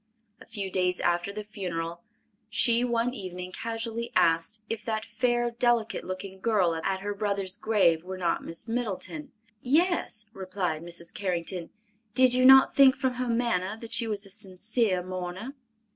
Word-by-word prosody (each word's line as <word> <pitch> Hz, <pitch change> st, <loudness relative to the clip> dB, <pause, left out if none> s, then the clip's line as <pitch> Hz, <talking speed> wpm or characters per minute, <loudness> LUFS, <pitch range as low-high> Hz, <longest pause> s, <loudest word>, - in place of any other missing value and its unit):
A -, -, -13 dB
few 200 Hz, -3 st, -4 dB
days 180 Hz, -1 st, +1 dB
after 175 Hz, +2 st, +1 dB
the 210 Hz, +1 st, -6 dB
funeral 170 Hz, -5 st, -5 dB, 0.5 s
she 230 Hz, +3 st, +3 dB
one 240 Hz, 0 st, 0 dB
evening 185 Hz, -4 st, -6 dB
casually 230 Hz, +2 st, -4 dB
asked, 165 Hz, +6 st, +2 dB
if 225 Hz, -1 st, -4 dB
that 220 Hz, -1 st, -2 dB
fair, 240 Hz, -1 st, 0 dB
delicate 235 Hz, -1 st, +1 dB
looking 190 Hz, +1 st, -6 dB
girl 190 Hz, -5 st, +2 dB
at 190 Hz, +4 st, -2 dB
her 205 Hz, +1 st, -2 dB
brother's 200 Hz, -2 st, -1 dB
grave 190 Hz, -8 st, +2 dB
were 185 Hz, +1 st, -6 dB
not 175 Hz, -2 st, 0 dB
Miss 165 Hz, +7 st, -5 dB
Middleton? 245 Hz, -, -3 dB, 0.3 s
"Yes," 300 Hz, -, +1 dB
replied 185 Hz, -5 st, -3 dB
Mrs. 170 Hz, 0 st, -6 dB
Carrington. 180 Hz, -3 st, -2 dB, 0.5 s
"Did 255 Hz, -1 st, +5 dB
you 255 Hz, 0 st, +4 dB
not 265 Hz, 0 st, +8 dB
think 270 Hz, -1 st, +7 dB
from 260 Hz, -1 st, 0 dB
her 250 Hz, 0 st, -3 dB
manner 230 Hz, -4 st, 0 dB
that 230 Hz, 0 st, -7 dB
she 230 Hz, -, +1 dB
was 210 Hz, -2 st, -3 dB
a 195 Hz, -, -8 dB
sincere 200 Hz, 0 st, -1 dB
mourner?" 185 Hz, +6 st, -5 dB
205 Hz, 160 wpm, -28 LUFS, 185-235 Hz, 0.5 s, not